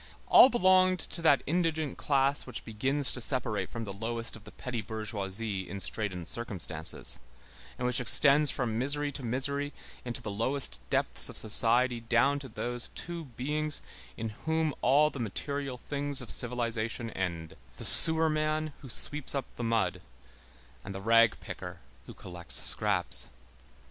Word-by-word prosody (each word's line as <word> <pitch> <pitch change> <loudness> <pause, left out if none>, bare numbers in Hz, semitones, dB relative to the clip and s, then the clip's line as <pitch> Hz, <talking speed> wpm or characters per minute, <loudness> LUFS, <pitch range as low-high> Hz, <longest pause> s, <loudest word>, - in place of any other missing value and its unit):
All 260 - +8
belonged 185 -5 +3
to 170 - -5
that 145 -4 +3
indigent 160 -2 -2
class 140 0 0
which 125 - -8
begins 130 +5 +1
to 125 - -1
separate 120 -3 -1
from 115 -1 -6
the 100 -3 -7
lowest 115 +3 -3
of 110 - -14
petty 120 -3 -5
bourgeoisie 105 -3 -5
in 100 +2 -7
straitened 90 -3 -4
circumstances, 90 -9 -2 0.6
and 125 - -4
which 125 0 +3
extends 140 +4 +9
from 115 -4 -2
misery 145 +3 +1
to 140 - -7
misery 140 +4 -1 0.3
into 120 +1 -4
the 110 -4 -7
lowest 130 +7 -2
depths - - +4
of - - -8
society 120 +3 +2
down 120 +5 +1
to 135 -2 -10
those 120 +2 -3
two 170 -1 -6
beings 150 +4 -3 0.3
in 115 - -4
whom 160 +7 -2
all 150 +3 +3
the 140 - -9
material 135 +4 -5
things 145 +1 -3
of 115 -6 -6
civilization 115 -1 -4
end, 85 -4 -5 0.2
the - - -6
sewer 160 0 +7
man 155 0 -2
who 135 - -11
sweeps 145 +4 -1
up 135 -2 -2
the 120 - -6
mud, 115 -2 -1 0.8
and 95 - -8
the - - -5
rag 115 +1 +3
picker - - -9 0.3
who - - -11
collects 85 -6 -2
scraps. 100 -4 0
125 Hz, 155 wpm, -29 LUFS, 110-145 Hz, 0.8 s, extends